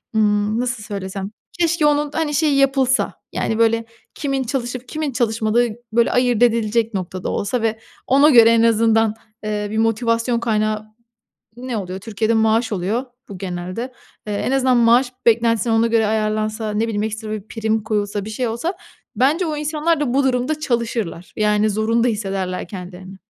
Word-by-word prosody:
ımm, 210 +1 +2
nasıl 245 -3 -3
söylesem, 195 -1 -5 0.3
keşke 335 -2 +2
onun, 295 0 +2
hani, 315 -1 -1
şeyi, 295 -2 +2
yapılsa, 270 -1 +2 0.2
yani, 225 0 -1
böyle, 230 0 +2 0.3
kimin 275 -2 -1
çalışıp 250 0 -4
kimin 305 -1 -3
çalışmadığı, 230 -1 +1 0.3
böyle, 235 +1 +3
ayırt 245 -2 +2
edilecek 230 -1 +2
noktada 185 -1 -4
olsa 220 +4 -1
ve 225 -1 -1 0.3
ona 280 +3 +5
göre 230 -5 +7
en 230 0 +4
azından, 225 -1 +3 0.3
eee, 210 -1 -2
bir 220 - -2
motivasyon 230 +1 +1
kaynağı, 215 -2 0 0.7
ne 250 -1 -4
oluyor, 190 -1 -5
Türkiye'de 220 +1 -1
maaş 225 +1 +2
oluyor 205 +7 -1 0.2
bu 195 - -7
genelde. 185 +7 -5 0.3
Eee, 210 - -2
en 205 - -1
azından 260 -2 +3
maaş 240 +2 +4
beklentisini 230 -1 +3
ona 225 +1 +3
göre 225 -1 +2
ayarlansa, 215 0 -1
ne 210 +2 0
bileyim, 210 -2 -1
ekstra 220 0 -4
bir 215 -1 -5
prim 220 -1 -1
koyulsa, 205 -2 -2
bir - - -6
şey 235 +3 -2
olsa, 235 - -2 0.4
bence 285 - +2
o 310 -2 -2
insanlar 305 +1 0
da 265 -5 -1
bu 275 +1 +3
durumda 260 +4 0
çalışırlar. 230 - -2
Yani, 210 0 +2
zorunda 225 +3 +1
hissederler 195 -5 -2
kendilerini. 185 +1 -9
225 Hz, 160 wpm, -20 LUFS, 215-250 Hz, 0.7 s, göre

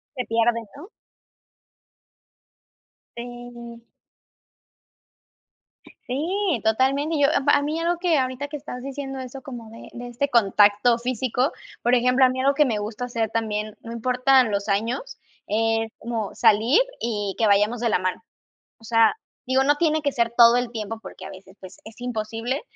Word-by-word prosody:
Se 250 - -2
pierde, 230 +1 +1 0.2
¿no? 335 +6 -10 2.3
Sí. 240 -1 -9 2.2
Sí, 330 - -1
totalmente. 270 +8 +1
Yo 280 - +5
a - - +2
p 290 - +4
a 285 - +4
mí 305 +3 -2
algo 340 +1 0
que, 345 -4 +2
ahorita 260 +2 -2
que 295 +1 -6
estás 250 -3 -8
diciendo 270 -1 -6
eso, 260 +1 -8
como 240 -4 -9
de 225 - -12
de 245 0 -7
este 260 +4 -2
contacto 210 +1 +4
físico, 255 +2 -1 0.3
por 245 +1 +4
ejemplo, 250 +2 +4
a - - +4
mí 260 0 -3
algo 275 +1 +3
que 295 +1 +3
me 225 -4 -1
gusta 215 +4 -5
hacer 230 -3 -2
también, 215 -1 -2
no 230 - -9
importan 250 0 +3
los 200 +1 -2
años, 230 - -2 0.3
es 225 +1 0
como 225 -3 -4
salir 225 - +4 0.2
y 205 -4 -3
que 225 - +2
vayamos 210 +4 +3
de 235 - +1
la 180 - +2
mano. 185 - -3 0.6
O - - -21
sea, 225 0 +4 0.3
digo, 260 +1 +2
no 290 +2 +3
tiene 315 0 +1
que 285 -1 0
ser 235 -2 0
todo 235 0 +7
el 245 -1 -2
tiempo 220 0 -5
porque - - -10
a - - -7
veces, 190 +1 -13
pues, 185 0 -12
es 220 +2 -13
imposible, 230 +2 -3
240 Hz, 165 wpm, -23 LUFS, 225-270 Hz, 2.3 s, todo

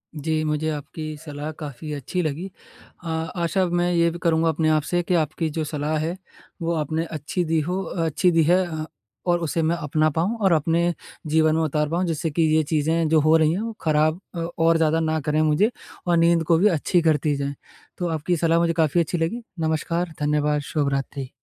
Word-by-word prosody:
जी, 155 +1 -1
मुझे 155 0 -1
आपकी 155 +1 -6
सलाह 150 0 -5
काफ़ी 150 +1 -7
अच्छी 145 +6 -3
लगी। 160 +5 -3 0.5
अ, - - -7
आशा 170 +2 -1
मैं 175 0 +1
ये 170 0 +3
भी 170 - -7
करूँगा 165 -1 +3
अपने 160 0 +1
आप 155 0 +3
से 175 +3 0
कि 180 - -1
आपकी 160 0 0
जो 155 +1 -2
सलाह 150 +1 -2
है, 165 +4 -2 0.4
वो 170 +1 0
आपने 160 +1 -1
अच्छी 160 +3 -3
दी 160 0 +1
हो 180 +5 -2
अच्छी 175 +2 0
दी 165 -1 +4
है 180 +4 +3
अ, 160 -2 -4 0.4
और 175 0 +3
उसे 165 +1 -1
मैं 160 +2 +1
अपना 155 0 +1
पाऊँ 170 +9 -1
और 190 -2 +4
अपने 165 +2 +2 0.3
जीवन 155 0 +3
में 160 - +1
उतार 150 -1 0
पाऊँ 175 +3 0
जिससे 165 -1 -1
कि 165 - 0
ये 160 - +3
चीज़ें 160 +2 +1
जो 160 0 +5
हो 155 +2 +4
रही 155 -1 +3
हैं 190 - -2
वो 230 0 -4
ख़राब 155 +1 +2 0.4
और 165 0 +4
ज़्यादा 160 0 +2
न 160 -1 0
करें 155 0 +2
मुझे 155 +9 +3 0.4
और 175 -1 +3
नींद 165 0 +4
को 165 +1 +3
भी 195 +6 +4
अच्छी 175 -1 +2
करती 155 -2 +2
जाएँ। 140 0 -3 0.4
तो 175 - -2
आपकी 160 +2 0
सलाह 165 +1 +2
मुझे 170 0 +2
काफ़ी 160 0 +2
अच्छी 170 +2 -2
लगी। 165 +9 -1 0.2
नमस्कार, 165 +2 -1
धन्यवाद, 150 0 +1
शुभ 145 0 -1
रात्रि। 135 -1 -3
160 Hz, 205 wpm, -23 LUFS, 155-170 Hz, 0.5 s, जो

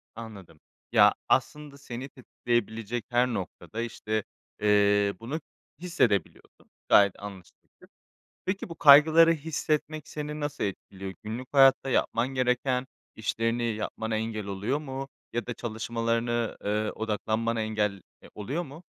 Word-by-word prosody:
Anladım. 100 -8 -10 0.3
Ya, - - +6 0.2
aslında 150 -2 0
seni 130 0 -7
tetikleyebilecek 120 -3 -3
her 125 +1 +3
noktada, 105 0 -5
işte, 110 -2 -3 0.4
ııı, 100 -1 +3
bunu 140 +8 -4 0.4
hissedebiliyordun, 120 - -1 0.2
gayet 100 -2 +5
anlaşılabilir. 95 -4 -12 0.6
Peki, 190 0 -2
bu 165 - -7
kaygıları 160 +2 +8
hissetmek 155 0 -2
seni 150 0 -5
nasıl 145 0 -3
etkiliyor, 95 -1 -5
günlük 115 +4 -5
hayatta 135 -1 +6
yapman 120 -1 +1
gereken 130 0 0 0.3
işlerini 115 +2 -1
yapmana 110 0 -2
engel 110 -2 -3
oluyor 100 +9 -2
mu 135 -2 -6 0.3
ya 120 -2 -2
da 120 - -2
çalışmalarını, 115 +1 -2
ııı, 105 +1 0
odaklanmana 110 +1 -1
engel, 105 -3 -1 0.2
eee, - - -15
oluyor 135 - -3
mu? 155 +3 -11
115 Hz, 120 wpm, -28 LUFS, 105-135 Hz, 0.6 s, kaygıları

